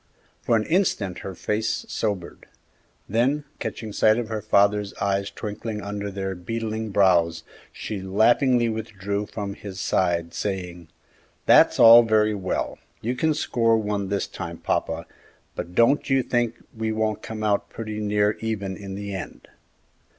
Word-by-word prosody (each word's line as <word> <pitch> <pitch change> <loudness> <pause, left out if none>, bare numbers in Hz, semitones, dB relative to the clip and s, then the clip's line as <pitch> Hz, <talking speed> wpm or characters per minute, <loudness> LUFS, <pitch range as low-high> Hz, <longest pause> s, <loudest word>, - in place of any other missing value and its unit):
For 115 - +2
an 110 -1 +1
instant 115 - 0
her 95 -1 -7
face 105 +6 -2
sobered; 100 -5 -4 0.6
then 130 +8 +1 0.2
catching 110 -2 -5
sight 110 +2 +4
of 120 -2 -3
her 110 -1 -3
father's 100 -1 +2
eyes 100 0 -1
twinkling 105 0 -5
under 100 0 -4
their 95 -1 -3
beetling 110 +4 -4
brows, 90 -5 +3 0.3
she 105 -3 -5
laughingly 120 +6 +3
withdrew 105 -2 -3
from 100 -2 -5
his 100 -2 -9
side, 85 -2 0
saying, 90 -3 -4 0.6
"That's - - +6
all 115 +1 +10
very 110 -2 +2
well; 95 -3 -3 0.2
you 120 +3 -2
can 155 +4 +1
score 115 -6 +2
one 105 -2 -2
this 100 0 0
time, 85 -2 -7
papa, - - -2 0.5
but 90 - -6
don't 125 +6 +3
you 135 -1 +3
think 120 -1 0 0.2
we 110 0 -2
won't 110 -1 -1
come 110 -1 -6
out 105 -1 +1
pretty 110 -1 -6
near 105 0 +1
even 100 -4 -3
in 100 -1 -7
the 100 0 -5
end!" 95 - -7
105 Hz, 150 wpm, -24 LUFS, 100-110 Hz, 0.6 s, all